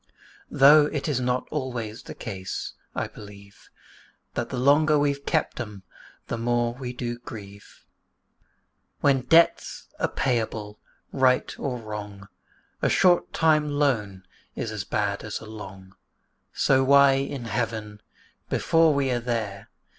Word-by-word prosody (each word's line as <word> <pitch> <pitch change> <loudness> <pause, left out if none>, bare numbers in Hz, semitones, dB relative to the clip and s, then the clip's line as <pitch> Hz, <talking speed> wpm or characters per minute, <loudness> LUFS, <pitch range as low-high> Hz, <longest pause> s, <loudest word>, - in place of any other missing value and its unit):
Though 145 +2 +7
it 150 0 -3
is 145 -4 0
not 125 0 -1
always 120 -6 -4
the - - -10
case, 95 -4 -6 0.2
I - - -1
believe, 100 -1 -14 0.6
That - - -3
the 130 - -4
longer 150 +4 +4
we've 140 -1 0
kept - - 0
'em, 105 -5 -7 0.4
the 115 - -4
more 120 0 0
do 125 - -16
we 125 -2 -4
grieve: 100 -4 -10
For, - - -30 0.5
when 140 -2 +3
debts 165 +7 +2
are - - +1
payable, 110 -4 -2 0.3
right 130 -1 +2
or 130 -3 -2
wrong, 105 -3 -8 0.5
A - - +2
short 180 -2 +3
time 155 -2 +2
loan 115 -10 0 0.3
is 110 - -4
as 105 -3 -4
bad 100 -2 -1
as 105 - -5
a - - -11
long 95 -3 -10 0.6
So 135 -1 +3
why 140 +1 +6
in 135 -2 -2
Heaven 110 -2 -3 0.5
(before 165 -2 +3
we 135 -2 +1
are 120 - 0
there!) 115 -5 -4
120 Hz, 140 wpm, -25 LUFS, 105-140 Hz, 0.6 s, Though